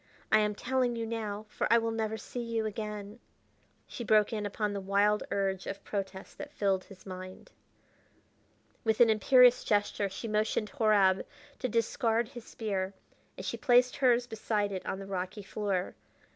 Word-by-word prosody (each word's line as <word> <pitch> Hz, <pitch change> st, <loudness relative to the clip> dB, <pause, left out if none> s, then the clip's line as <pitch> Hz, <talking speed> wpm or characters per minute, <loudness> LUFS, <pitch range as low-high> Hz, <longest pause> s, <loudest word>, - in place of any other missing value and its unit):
I 215 Hz, -, +7 dB
am 210 Hz, -1 st, +1 dB
telling 250 Hz, +1 st, 0 dB
you 230 Hz, 0 st, -2 dB
now, 215 Hz, -2 st, -4 dB
for -, -, -2 dB
I 235 Hz, -, +7 dB
will 230 Hz, 0 st, 0 dB
never 220 Hz, -1 st, -2 dB
see 245 Hz, -, -7 dB
you 230 Hz, -1 st, -2 dB
again." 210 Hz, 0 st, -5 dB, 0.7 s
She 240 Hz, -, -7 dB
broke 215 Hz, -1 st, +3 dB
in 210 Hz, -2 st, -2 dB
upon 205 Hz, 0 st, -2 dB
the 200 Hz, -, -3 dB
wild 200 Hz, +2 st, +2 dB
urge 195 Hz, -1 st, -1 dB
of 200 Hz, -, -5 dB
protest 195 Hz, -2 st, -5 dB
that 295 Hz, 0 st, -7 dB
filled 195 Hz, -5 st, 0 dB
his 195 Hz, -2 st, -15 dB
mind. 185 Hz, -1 st, -9 dB, 1.3 s
With 220 Hz, -1 st, +1 dB
an 235 Hz, -2 st, +7 dB
imperious 250 Hz, +3 st, +6 dB
gesture 205 Hz, -1 st, +1 dB
she 210 Hz, +4 st, -6 dB
motioned 215 Hz, 0 st, 0 dB
Horab 210 Hz, -7 st, +3 dB, 0.4 s
to 255 Hz, -, -1 dB
discard 230 Hz, 0 st, +1 dB
his 240 Hz, -3 st, -10 dB
spear, 195 Hz, -3 st, -3 dB, 0.4 s
and -, -, -7 dB
she -, -, -3 dB
placed 250 Hz, 0 st, +4 dB
hers 245 Hz, -2 st, +3 dB
beside 215 Hz, -3 st, -1 dB
it 190 Hz, -1 st, -4 dB
on -, -, -2 dB
the 195 Hz, -, -7 dB
rocky 195 Hz, +2 st, -4 dB
floor. 195 Hz, -2 st, -2 dB
215 Hz, 170 wpm, -30 LUFS, 200-230 Hz, 1.3 s, I